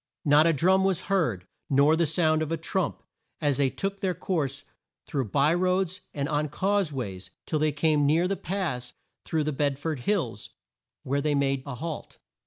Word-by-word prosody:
Not 150 +2 +6
a - - +5
drum 190 +6 +3
was 190 -2 +1
heard, 160 - 0 0.2
nor 140 +3 +5
the 165 0 +2
sound 155 0 +2
of 155 0 -2
a 165 - 0
trump 175 +4 -2 0.4
as 145 -4 +1
they 140 -2 +3
took 195 +7 -4
their 185 -2 -1
course 145 -6 -2 0.4
through 135 -3 -2
by 140 +9 +2
roads 185 +1 0
and 140 -1 -2
on 150 0 0
cause 195 +2 0
ways 100 -9 -5 0.2
till 155 - -1
they 155 0 +2
came 150 -1 +2
near 165 +5 +3
the 195 - 0
pass 165 -12 -3 0.3
through 160 -1 0
the 155 0 -1
Bed 140 0 0
ford 155 -1 -3
Hills 125 - -1 0.5
where 140 +2 0
they 150 0 +1
made 135 -1 +1
a 140 - -4
halt. 160 +4 -6
155 Hz, 190 wpm, -27 LUFS, 140-180 Hz, 0.5 s, Not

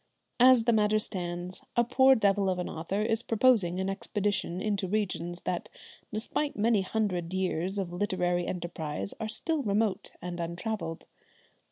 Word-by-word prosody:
As 250 -1 +7
the 235 0 +3
matter 215 0 +3
stands, 180 -3 -3 0.2
a 240 - +6
poor 260 +2 +5
devil 200 -3 +2
of 185 - 0
an 180 - -2
author 190 +6 -2
is 225 0 +1
proposing 225 -7 +3
an 190 - -1
expedition 195 -2 -1
into 200 -2 -1
regions 180 -4 -2
that, 175 - -3 0.4
despite 235 +7 -2
many 215 -1 +3
hundred 185 -4 -1
years 185 0 -1
of 185 -3 -3
literary 175 -2 0
enterprise, 160 - -4
are 220 - -3
still 310 +7 -1
remote 210 -3 0
and 180 0 -6
untravelled. 170 0 -4
195 Hz, 150 wpm, -29 LUFS, 175-220 Hz, 0.4 s, As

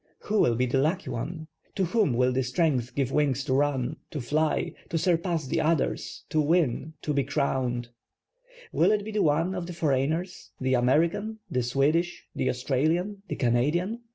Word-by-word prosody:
\\1i() 215 0 +2
will 120 - +3
be 125 +2 +1
the 130 +2 +1
lucky 165 +7 0
one? 160 +7 -4 0.3
To 190 - +1
whom 205 - +2
will 125 +1 +3
the 130 +1 +1
strength 130 -2 0
give 135 -2 0
wings 140 -3 +1
to 135 -2 -1
run, 140 0 +1
to 150 - -4
fly, 150 +5 0 0.2
to 165 - 0
surpass 170 -1 +1
the - - 0
others, 160 -1 -1
to 155 - +2
win, 155 -1 +1
to 150 - -1
be 140 -1 +2
crowned? 130 -4 -1 0.8
Will - - +3
it 210 -1 +1
be 220 - -5
one 165 +2 +2
of 180 -2 -4
the 180 - -6
foreigners, 160 +3 -1
the 130 0 0
American, 165 - +2
the 125 - +1
Swedish, 145 +8 +1
the - - 0
Australian, 160 +10 0
the - - -3
Canadian? 150 - +1
150 Hz, 175 wpm, -27 LUFS, 130-170 Hz, 0.8 s, will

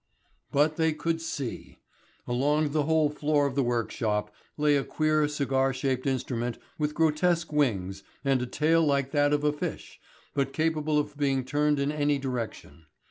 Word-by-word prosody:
But 150 +2 +2
they 160 -1 +2
could 165 +1 -2
see. 140 -6 -5 0.5
Along 145 +5 +1
the 150 -1 +1
whole 155 -1 +2
floor 150 -1 +1
of 140 - -1
the 140 - +1
workshop 110 -3 -1 0.2
lay 150 -1 +3
a 140 - +1
queer, 155 -1 +1
cigar 135 -2 0
shaped 130 0 -1
instrument 120 -2 -2 0.2
with 150 0 -1
grotesque 165 +1 +1
wings 100 -10 0 0.2
and 135 -2 +2
a 125 - -2
tail 160 +5 +2
like 140 -2 +1
that 145 0 +3
of 150 0 +1
a 150 0 +2
fish, 150 - -6 0.3
but 135 -2 -1
capable 155 -1 0
of 145 -1 -2
being 135 -3 +1
turned 150 +2 +1
in 140 +1 0
any 145 -1 +1
direction. 115 - -5
145 Hz, 165 wpm, -28 LUFS, 130-150 Hz, 0.5 s, lay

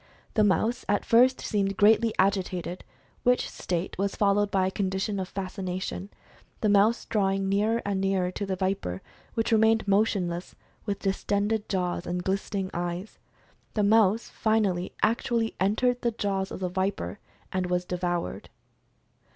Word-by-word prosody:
The 215 - +3
mouse 220 +4 +1
at 205 -1 +1
first 250 +3 +5
seemed 195 -2 -1
greatlv 220 +2 +5
agitated, 185 -2 0 0.4
which 250 0 +2
state 175 +1 -3
was 200 0 0
followed 205 0 +2
by 190 -2 +2
a 190 - 0
condition 195 +1 -1
of 185 - -3
fascination, 185 0 -4 0.5
the 215 - +2
mouse 205 +3 +4
drawing 195 -2 0
nearer 210 +4 +1
and 200 -1 -1
nearer 190 -2 +1
to 200 +2 -4
the 190 - -1
viper 185 - -2 0.3
which 225 +1 0
remained 220 -1 +4
motionless 195 -4 0 0.3
with 200 -1 -1
distended 205 +2 -1
jaws, 180 -2 -1
and 180 +1 -2
glistening 195 0 -2
eyes. 175 +3 -4 0.6
The 210 - +2
mouse, 220 +1 +4
finally, 205 -5 0
actually 230 0 +1
entered 245 +6 +1
the 240 - +2
jaws 200 -3 -2
of - - -7
the 185 - 0
viper, 195 +2 -2 0.3
and 185 -1 0
was 180 0 0
devoured. 175 - -3
195 Hz, 145 wpm, -27 LUFS, 185-215 Hz, 0.6 s, first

